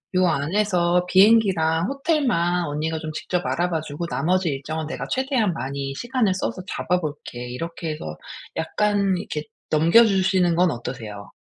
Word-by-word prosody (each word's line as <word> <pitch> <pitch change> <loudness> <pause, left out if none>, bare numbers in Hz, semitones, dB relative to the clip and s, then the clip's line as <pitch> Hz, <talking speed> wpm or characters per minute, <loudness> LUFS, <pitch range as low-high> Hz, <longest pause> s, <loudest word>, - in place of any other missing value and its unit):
요 185 0 +4
안에서 175 +2 +1
비행기랑 185 -4 +4
호텔만 255 - +1
언니가 155 +2 -2
좀 155 -1 -5
직접 180 +3 -2
알아봐 170 -2 0
주고 155 +2 -5
나머지 170 +7 +1
일정은 150 +3 -4
내가 - - -4
최대한 260 -7 +1
많이 135 0 -4
시간을 240 - 0
써서 185 0 -3
잡아 180 -2 0
볼게." 145 -5 -6
이렇게 165 +5 -5
해서 80 - -6 0.4
약간 200 +3 +1
이렇게 155 -5 -4 0.3
넘겨 165 +10 +6
주시는 190 -4 +2
건 180 0 +3
어떠세요? 110 -5 -7
175 Hz, 335 characters per minute, -23 LUFS, 150-195 Hz, 0.4 s, 넘겨